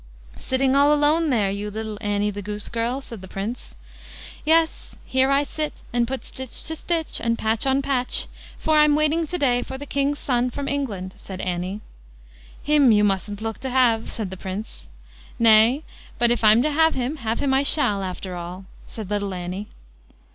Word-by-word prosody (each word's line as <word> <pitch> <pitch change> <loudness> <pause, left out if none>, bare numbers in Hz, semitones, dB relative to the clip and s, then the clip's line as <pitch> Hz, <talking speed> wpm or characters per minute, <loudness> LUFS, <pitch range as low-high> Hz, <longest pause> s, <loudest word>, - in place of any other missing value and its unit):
"Sitting 260 +1 +1
all 285 +1 +5
alone 300 +2 +3
there, 210 -7 +2
you 205 +1 -4
little 215 0 -5
Annie, 205 -1 0
the 205 0 -6
goose 210 +1 -5
girl", 235 +3 -2
said 230 -6 -9
the 190 - -10
Prince. 200 - -6 0.7
"Yes, 320 +1 +1
here 260 +1 +2
I 275 +1 +3
sit, 305 +1 -5
and 240 -1 +2
put 265 +1 -5
stitch 260 -2 -6
to 320 - -4
stitch, 330 0 -1
and 230 0 +1
patch 220 +4 0
on 270 +1 +2
patch; 260 -3 +1 0.3
for 310 -1 +2
I'm 300 -1 +5
waiting 305 +2 +1
to 355 - -2
day 245 -6 +2
for 265 - -6
the 285 - -7
king's 280 +1 0
son 250 -3 0
from 280 +3 -5
England", 210 -10 -2
said 190 -1 -8
Annie. 185 +3 -3 0.8
"Him 290 -4 +5
you 210 -1 +4
mustn't 205 +1 -1
look 225 -1 -4
to 265 - -4
have", 245 -3 +2
said 210 -5 -5
the 190 - -7
Prince. 190 - -7 0.5
"Nay, 230 +5 +5 0.3
but 235 0 +3
if 240 - 0
I'm 220 +3 +6
to 305 - +1
have 320 +2 +3
him, 260 +4 -2
have 225 -3 -2
him 275 -2 +1
I 265 - +4
shall, 275 -9 +2
after 185 0 -5
all", 175 +2 -7 0.2
said 210 -3 -8
little 200 -2 -1
Annie. 180 +3 -5
240 Hz, 190 wpm, -23 LUFS, 205-280 Hz, 0.8 s, I'm